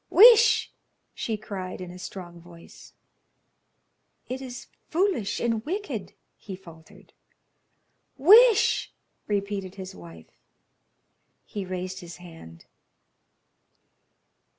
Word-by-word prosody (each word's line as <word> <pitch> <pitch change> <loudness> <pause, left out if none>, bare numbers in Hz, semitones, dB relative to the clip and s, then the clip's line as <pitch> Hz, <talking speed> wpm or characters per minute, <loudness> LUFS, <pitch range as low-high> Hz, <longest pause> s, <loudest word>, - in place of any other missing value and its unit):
"Wish!" 455 +1 +7 0.4
she 220 -2 -3
cried, 190 -3 -7
in 180 -1 -7
a 180 - -11
strong 175 -2 -9
voice. 170 -1 -15 1.3
"It 255 +1 -5
is 255 -2 -8 0.2
foolish 345 - 0
and 230 -2 -1
wicked," 395 - -5 0.3
he 195 - -8
faltered. 165 -4 -17 1.0
"Wish!" 430 - +6 0.4
repeated 200 -2 -3
his 190 -1 -8
wife. 85 -2 -14 1.1
He 205 -2 -6
raised 185 0 -5
his 175 -2 -10
hand. 165 - -13
195 Hz, 90 wpm, -26 LUFS, 175-260 Hz, 1.3 s, Wish